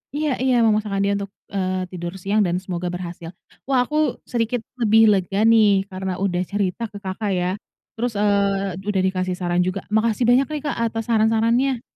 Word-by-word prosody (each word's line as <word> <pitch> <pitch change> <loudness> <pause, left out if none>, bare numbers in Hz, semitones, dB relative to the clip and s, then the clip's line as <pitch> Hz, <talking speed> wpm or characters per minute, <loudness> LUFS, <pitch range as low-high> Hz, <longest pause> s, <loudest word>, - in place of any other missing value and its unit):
iya 300 -1 0
iya 260 -1 +3
memaksakan 210 -2 +1
dia 200 - +1
untuk, 200 -1 -6 0.2
eee, 185 -1 -1
tidur 175 0 -5
siang 205 +3 +1
dan 175 0 0
semoga 180 -1 -4
berhasil, 175 -2 -6 0.4
wah 260 -2 +3
aku 305 +4 0
sedikit 235 0 -1 0.2
lebih 225 -1 +5
lega 195 +1 +1
nih 215 -4 +5
karena 190 0 -3
udah 180 -2 0
cerita 205 +3 -2
ke 205 - -8
Kakak 195 +2 -3
ya, 180 +1 0 0.5
terus, 240 +1 -1
eee, 200 -2 +1
udah 195 -2 +1
dikasih 185 -1 -1
saran 175 -1 -1
juga 185 +1 -3
makasih 220 +2 +1
banyak 255 +2 +4
nih 300 -2 -4
Kak 290 - -2
atas 225 0 -4
saran-sarannya. 230 +3 +2
205 Hz, 175 wpm, -22 LUFS, 185-230 Hz, 0.5 s, lebih